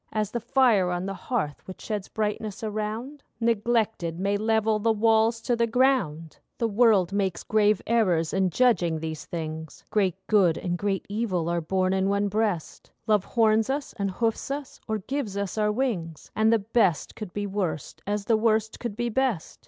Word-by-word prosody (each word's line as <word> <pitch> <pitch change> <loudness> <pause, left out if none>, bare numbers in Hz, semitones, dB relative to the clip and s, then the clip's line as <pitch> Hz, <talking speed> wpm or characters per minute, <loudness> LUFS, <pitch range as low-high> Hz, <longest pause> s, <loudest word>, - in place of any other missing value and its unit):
As 215 -2 -1
the 235 - -2
fire 230 -6 +3
on 180 +1 -2
the 195 - -3
hearth 190 - -3
which 185 - -9
sheds 210 -3 -4
brightness 210 -1 -3
around, 220 +6 -4 0.2
Neglected, 225 -6 0
may 200 +2 +1
level 220 0 +1
the 225 +2 +2
walls 225 +1 +3
to 240 - 0
the 235 0 +1
ground. 225 - +1 0.2
The 230 - +1
world 205 -4 +3
makes 195 -3 -1
grave 210 -2 +2
errors 185 -9 +2
in 190 -1 +2
judging 180 -7 +2
these 160 -1 -5
things. 160 -2 -6
Great 195 -5 +2
good 190 -7 +3
and 175 -1 -2
great 195 +1 -2
evil 200 -6 -1
are 170 0 0
born 185 +3 0
in 190 0 +1
one 200 0 +1
breast: 205 -5 -2 0.2
Love 210 -3 +2
horns 220 -1 +2
us 280 +1 -2
and 200 -3 -2
hoofs 225 +6 -1
us, 280 -1 -5
or 220 -1 0
gives 220 -1 -4
us 200 -2 -3
our 210 -1 +1
wings, 205 - -3
And 220 +1 +3
the 230 - +5
best 205 -6 +1
could 210 -4 -7
be 205 +2 -3
worst, 185 -7 -3
as 205 0 -1
the 225 0 +3
worst 220 -1 +1
could 235 -4 -4
be 240 +1 -1
best. 240 -7 -1
210 Hz, 185 wpm, -26 LUFS, 185-225 Hz, 0.2 s, the